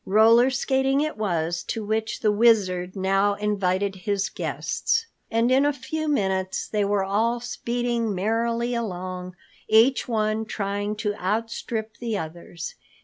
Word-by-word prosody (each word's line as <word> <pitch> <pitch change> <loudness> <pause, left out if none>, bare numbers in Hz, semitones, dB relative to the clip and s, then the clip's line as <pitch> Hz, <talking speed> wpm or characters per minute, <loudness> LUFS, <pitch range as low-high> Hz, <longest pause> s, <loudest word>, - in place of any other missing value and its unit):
Roller 225 +5 +5
skating 265 +1 +1
it 310 0 -1
was 175 -5 -1
to 220 +5 -4
which 220 +1 -2
the 215 - +3
Wizard 200 -5 +3
now 195 +1 +2
invited 200 -2 0
his 200 +1 -1
guests. 455 0 -1 0.2
And 230 +2 +2
in 265 +2 +5
a 290 - +3
few 310 +2 -4
moments 190 -8 0
they 210 -1 0
were 200 -1 +1
all 225 +5 +1
speeding 235 -2 -2
merrily 230 +4 0
along, 185 -5 -4 0.3
each 230 +5 +4
one 220 -1 0
trying 205 0 -2
to 210 -1 -1
outstrip 220 +2 -2
the 230 -3 -2
others. 170 0 -6
215 Hz, 140 wpm, -25 LUFS, 195-235 Hz, 0.3 s, Roller